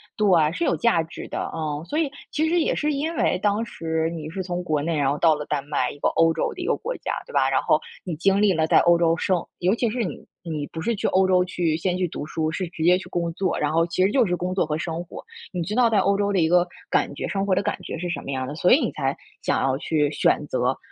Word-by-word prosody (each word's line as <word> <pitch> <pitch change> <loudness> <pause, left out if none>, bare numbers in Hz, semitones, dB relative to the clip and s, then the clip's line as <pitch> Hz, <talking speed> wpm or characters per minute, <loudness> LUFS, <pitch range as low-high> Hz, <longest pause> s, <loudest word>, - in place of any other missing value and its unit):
对， 210 - +1
嗯， 160 -3 +4
是 340 - -2
有 - - +2
价 235 -9 +3
值 160 - -8
的， - - -4
嗯。 155 -2 -3
所 300 - -3
以 315 -4 +1 0.2
其 315 +1 0
实 340 +1 +2
也 - - +1
是 300 0 0
因 315 +4 -2
为 180 - +1
当 210 +2 +1
时 160 -3 -2
你 155 -2 -6
是 190 +2 -4
从 180 0 -3
国 155 -4 0
内 165 +1 -1
然 140 -2 +2
后 145 - 0
到 160 0 +4
了 150 -1 -3
丹 140 -2 -2
麦， 145 -4 0
一 - - -9
个 - - 0
欧 165 0 +3
洲 160 - -1
的 365 - -8
一 355 - -3
个 - - +2
国 - - -4
家， - - -4
对 - - -13
吧？ - - +3
然 - - +2
后 - - +3 0.2
你 175 -4 -4
经 195 +5 +2
历 195 -3 +4
了 160 -1 +1
在 - - +4
欧 175 0 +5
洲 165 -1 +3
生 185 -1 0
尤 185 +3 +2
其 235 0 0
是 235 +1 -1
你 180 - -5 0.2
你 155 -4 -4
不 160 - -8
是 235 +4 0
去 - - -1
欧 190 0 +3
洲 180 -1 +4
去， 175 -3 -1
先 180 +2 -1
去 185 -1 0
读 145 - -6
书， 155 0 -2
是 180 +2 -3
直 165 -1 -6
接 180 +2 +6
去 - - -11
工 170 -1 -2
作， 185 +1 -1
然 150 - 0
后 165 +1 +2
其 185 +2 0
实 195 - +1
就 255 0 +4
是 180 - 0
工 180 +1 -3
作 185 -4 +1
和 150 - -1
生 165 +1 -4
活。 175 - -10 0.3
你 175 -2 -2
知 205 - -4
道 245 -1 +4
在 220 - +2
欧 200 +1 +3
洲 205 0 0
的 195 - +1
一 160 - +3
个 175 +1 +3 0.2
感 140 - +1
觉 - - -4
生 195 -1 -1
活 190 - +3
的 200 - 0
感 - - -2
觉 - - -6
是 175 +2 -4
什 - - -3
么 - - -9
样 130 -1 -2
的， 140 - -5
所 170 +4 +2
以 275 - +7
你 - - -1
才 135 -2 -2 0.2
想 - - 0
要 135 -1 +1
去 150 -3 0
选 150 0 +1
择 130 -1 0
175 Hz, 320 characters per minute, -24 LUFS, 160-195 Hz, 0.3 s, 以